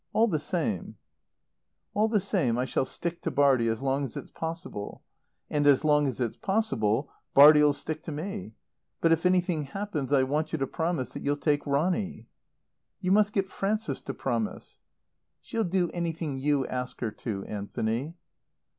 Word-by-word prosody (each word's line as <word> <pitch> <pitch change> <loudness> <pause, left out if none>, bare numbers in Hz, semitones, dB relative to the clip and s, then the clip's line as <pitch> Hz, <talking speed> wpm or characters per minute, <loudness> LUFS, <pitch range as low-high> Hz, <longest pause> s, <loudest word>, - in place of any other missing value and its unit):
All 225 +1 +4
the 160 -8 0
same 125 - -2 0.5
" 75 +2 -54
"All 215 +2 +3
the 220 -1 +2
same 175 - +1
I 125 - +1
shall 130 - 0
stick 170 +5 -5
to - - -1
Bartie 135 -4 +3
as 115 +3 -1
long 135 +1 +1
as 135 - -5
it's - - -8
possible. 160 -11 -6 0.4
And 145 -1 +1
as 145 +1 +5
long 150 -1 +4
as 130 - -3
it's 120 -3 -2
possible 135 - 0 0.2
Bartie'll 150 +1 +9
stick 155 +2 -5
to - - -4
me. 165 - -5 0.4
But, 165 - +3
if 165 +2 +3
anything 180 -4 +1
happens 150 -3 -4
I 135 -2 +5
want 150 +4 -1
you - - +1
to 135 - 0
promise 160 -2 -2
that - - -6
you'll 145 0 0
take 145 -1 0
Ronny." 180 +8 0 0.7
"You 185 -1 -1
must 210 +1 +4
get 195 -2 0
Frances 215 +3 -2
to - - -5
promise." - - -3 0.6
"She'll 230 -3 -2
do 180 -1 0
anything 165 -4 -3
you 140 0 +1
ask 125 0 -4
her 115 -3 -1
to, 100 -3 -5
Anthony." 110 +8 -3
150 Hz, 170 wpm, -28 LUFS, 130-175 Hz, 0.7 s, Bartie'll